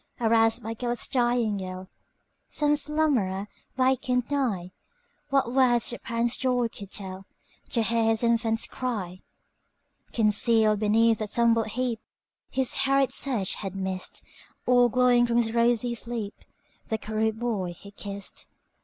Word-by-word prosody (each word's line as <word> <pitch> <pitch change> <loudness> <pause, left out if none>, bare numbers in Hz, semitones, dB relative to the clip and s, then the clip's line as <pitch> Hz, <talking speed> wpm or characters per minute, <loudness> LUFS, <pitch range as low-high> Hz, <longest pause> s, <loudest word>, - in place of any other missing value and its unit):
Aroused 225 0 +3
by 225 +2 -4
Gêlert's 240 +1 -3
dying 240 -5 +1
yell, 185 0 -7 0.6
Some 295 -1 +2
slumberer 275 -11 0 0.3
wakened 255 -1 +1
nigh:What 275 - -3
words 250 -3 +3
the 240 - -6
parent's 235 0 -1
joy 250 -2 +1
could 200 -3 -9
tellTo 190 -1 -7 0.5
hear 230 -1 +1
his 225 +1 +1
infant's 230 -1 +1
cry! 195 -8 -4 0.9
Concealed 215 -1 +3
beneath 225 +1 +3
a 215 - -1
tumbled 230 0 +2
heapHis 250 +2 -4
hurried 275 0 +3
search 235 -9 0
had 195 -2 -6
missed, 190 -1 -4 0.4
All 245 -1 +5
glowing 245 0 +4
from 235 0 +1
his 225 -1 +1
rosy 235 0 +2
sleep, 230 -3 -4 0.5
The 220 - -1
cherub 220 +1 -1
boy 205 -7 -2
he 200 +4 -14
kissed. 200 -1 -7
230 Hz, 125 wpm, -26 LUFS, 210-245 Hz, 0.9 s, All